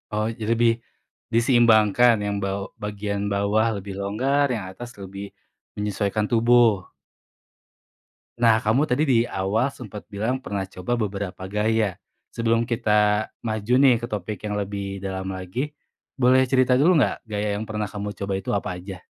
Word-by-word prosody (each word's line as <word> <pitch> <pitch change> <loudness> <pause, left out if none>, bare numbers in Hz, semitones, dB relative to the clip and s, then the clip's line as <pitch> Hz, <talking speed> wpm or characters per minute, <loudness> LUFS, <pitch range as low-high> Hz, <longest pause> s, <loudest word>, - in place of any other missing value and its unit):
Oh, 105 +1 0
jadi 115 -1 -3
lebih 120 -1 +5 0.6
diseimbangkan 115 -1 +5
yang 105 0 -2
baw 100 0 -2 0.2
bagian 100 0 -3
bawah 105 +2 +1
lebih 100 0 -8
longgar, 130 +8 +1
yang 105 -6 -3
atas 120 +6 -9
lebih 100 +1 -8 0.5
menyesuaikan 105 0 -1
tubuh. 115 -4 +4 1.5
Nah 115 -2 +4
kamu 125 +8 +2
tadi 140 +2 +1
di 130 -6 +3
awal 100 +6 0
sempat 105 -4 -9
bilang 110 +5 -2
pernah 100 -6 -3
coba 95 +4 -3
beberapa 100 -4 -4
gaya. 105 -2 0 0.3
Sebelum 115 0 +1
kita 105 -3 +2 0.2
maju 110 +1 -1
nih 130 -1 +6
ke 120 - -5
topik 105 -2 -4
yang 105 - -2
lebih 100 -1 -4
dalam 95 -1 -4
lagi, 120 +12 -4 0.4
boleh 130 0 +4
cerita 130 0 +3
dulu 175 +6 +5
nggak 115 - +1
gaya 105 -1 -2
yang 110 - -5
pernah 105 -1 -3
kamu 105 0 -5
coba 100 +1 -3
itu - - -7
apa 100 - -2
aja? 90 0 -9
105 Hz, 150 wpm, -24 LUFS, 100-120 Hz, 1.5 s, nih